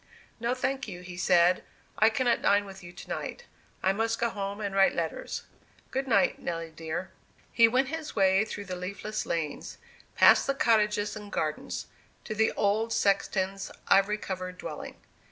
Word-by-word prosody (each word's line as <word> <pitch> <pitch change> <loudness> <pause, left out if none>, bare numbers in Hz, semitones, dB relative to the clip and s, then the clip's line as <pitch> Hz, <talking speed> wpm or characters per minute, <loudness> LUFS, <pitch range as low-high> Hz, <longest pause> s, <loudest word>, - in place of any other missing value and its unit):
"No, 240 +2 0
thank 265 +1 -2
you," 180 -3 -7
he 180 0 -9
said; 180 0 +4 0.4
"I 220 - +6
cannot 240 +1 +1
dine 205 0 +3
with 195 -1 -10
you 175 - -9
to - - -11
night; 485 - -5 0.4
I 190 - +3
must 225 +2 0
go 235 -1 +1
home 200 0 -4
and 200 -2 -3
write 195 0 +4
letters. 165 -2 -3 0.5
Good 270 +1 -2
night, 260 +2 +3
Nelly 165 -1 -4
dear." 165 +3 -5 0.4
He 230 -1 +7
went 255 +3 +1
his 320 0 -5
way 195 0 +4
through 205 -2 -6
the 185 -1 -5
leafless 200 +4 -4
lanes, 160 -3 -3 0.4
past - - +7
the 275 - +1
cottages 210 -4 +2
and 210 -1 -9
gardens, 155 -1 -3 0.4
to 215 - -4
the 220 +1 +2
old 215 +3 +1
sexton's 195 -1 0 0.2
ivy 195 +2 +4
covered 185 -2 -5
dwelling. - - -7
200 Hz, 170 wpm, -28 LUFS, 185-225 Hz, 0.5 s, He